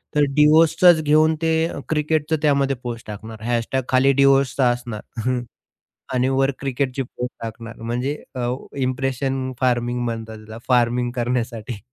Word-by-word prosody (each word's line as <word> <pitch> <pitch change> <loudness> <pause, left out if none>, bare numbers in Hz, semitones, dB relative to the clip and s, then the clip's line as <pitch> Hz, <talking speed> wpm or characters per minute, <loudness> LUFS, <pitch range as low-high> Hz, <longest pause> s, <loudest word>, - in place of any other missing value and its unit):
तर 150 - +4
डिवोर्सचंच 160 +3 +6
घेऊन 155 +1 +4
ते 160 0 +2
अह, - - -6
क्रिकेटचं 155 0 +1
त्यामध्ये 140 -2 +2
पोस्ट 120 -2 -6
टाकणार. 110 +1 -8
# 120 +2 0
खाली 130 +1 +4
डिवोर्सचं 135 -1 +3
असणार. 120 +1 -4 0.8
आणि 125 +1 +2
वर 135 0 +2
क्रिकेटची 135 -1 -2
पोस्ट 125 0 -6
टाकणार. 115 0 -7
म्हणजे 125 +5 -2 0.2
अ, 120 0 -1 0.2
इंप्रेशन 130 0 -1
फार्मिंग 120 -1 +1
म्हणतात 115 -1 -4
त्याला. 110 +1 -10
फार्मिंग 120 -1 +2
करण्यासाठी. 120 -2 -2
130 Hz, 130 wpm, -22 LUFS, 120-140 Hz, 0.8 s, डिवोर्सचंच